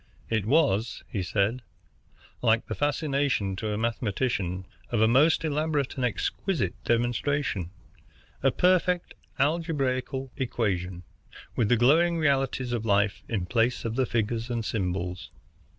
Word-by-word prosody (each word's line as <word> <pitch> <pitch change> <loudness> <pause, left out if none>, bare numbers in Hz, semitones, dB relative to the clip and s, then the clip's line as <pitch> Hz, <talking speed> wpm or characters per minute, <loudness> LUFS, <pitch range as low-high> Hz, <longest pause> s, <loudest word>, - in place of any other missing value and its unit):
It 110 -3 0
was, 120 -6 +2
he 100 - -3
said, 100 +7 0 0.8
like 115 -1 +3
the - - -4
fascination 140 - 0
to 110 +1 -2
a 105 - -1
mathematician 105 -5 -1 0.2
of 120 - 0
a 110 - +5
most 145 +8 +4
elaborate 150 -2 0
and 130 - -3
exquisite 125 - -1
demonstration, 120 - 0 0.7
a 135 - +4
perfect 180 +3 +2 0.2
algebraical 135 -4 0
equation, 95 -8 -2 0.5
with 110 -3 +1
the 120 - +4
glowing 165 +8 +4
realities 135 -4 +1
of 115 -2 -1
life 105 -1 +2
in 100 -6 -1
place 120 +5 +1
of 115 0 -2
figures 115 +1 -1
and 115 -2 -2
symbols. 90 -3 -2
120 Hz, 125 wpm, -27 LUFS, 105-140 Hz, 0.8 s, a